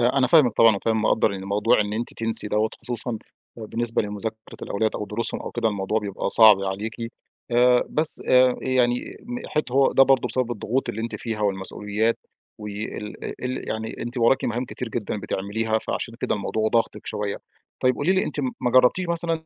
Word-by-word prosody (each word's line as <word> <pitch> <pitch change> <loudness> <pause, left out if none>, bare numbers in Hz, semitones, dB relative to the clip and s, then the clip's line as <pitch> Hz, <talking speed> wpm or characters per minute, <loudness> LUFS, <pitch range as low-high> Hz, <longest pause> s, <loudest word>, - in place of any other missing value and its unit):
آآ 125 +3 +2
أنا 130 - +4
فاهمِك 130 -4 +5
طبعًا 115 -2 +6
وفاهم 110 +2 0
مقدّر 110 0 +2
يعني 95 -1 -6
الموضوع 105 +4 +2
إن 105 0 -1
أنتِ 115 +2 -3
تنسي 115 -2 0
دوّة، 105 +1 +1
خصوصًا 120 -1 -3 0.4
بالنسبة 115 +1 -1
لمذاكرة 110 +1 -6
الأولاد 110 +2 0
أو 105 - -4
دروسهم 115 +2 -1
أو - - -6
كده 110 - 0
الموضوع 100 +1 -1
بيبقى 100 -2 -3
صعب 110 -3 +7
عليكِ، 100 +3 -3 0.6
آآ 125 +1 +4
بس 155 +1 +3
آآ 125 0 +5
يعني 125 -2 +2 0.3
إن 245 +2 -5
حِت 150 -5 -2
هو 135 +1 +4
ده 135 - +6
برضه 135 -1 +3
بسبب 130 -2 0
الضغوط 120 +4 -2
اللي 110 - -3
أنتِ 115 +1 -4
فيها 110 -3 -5
والمسؤوليات، 105 +3 0 0.4
وال 105 0 -6 0.2
ال 130 +1 -4
يعني 110 0 -4
أنتِ 120 +2 -5
وراكِ 125 +3 +3
مهام 120 +2 -1
كتير 125 -1 -6
جدًا 105 -2 -4
بتعمليها، 110 +4 -1
فعشان 115 +1 -4
كده - - 0
الموضوع 110 +2 -1
ضاغطِك 115 0 -1
شوية، 105 -1 -3 0.4
طيب 130 0 +3
قولي 160 +9 +1
لي 190 - +2
أنتِ - - -4
ما 235 - -2
جرّبتيش 130 +9 +4
مثلًا 170 0 -1
115 Hz, 185 wpm, -24 LUFS, 105-125 Hz, 0.6 s, صعب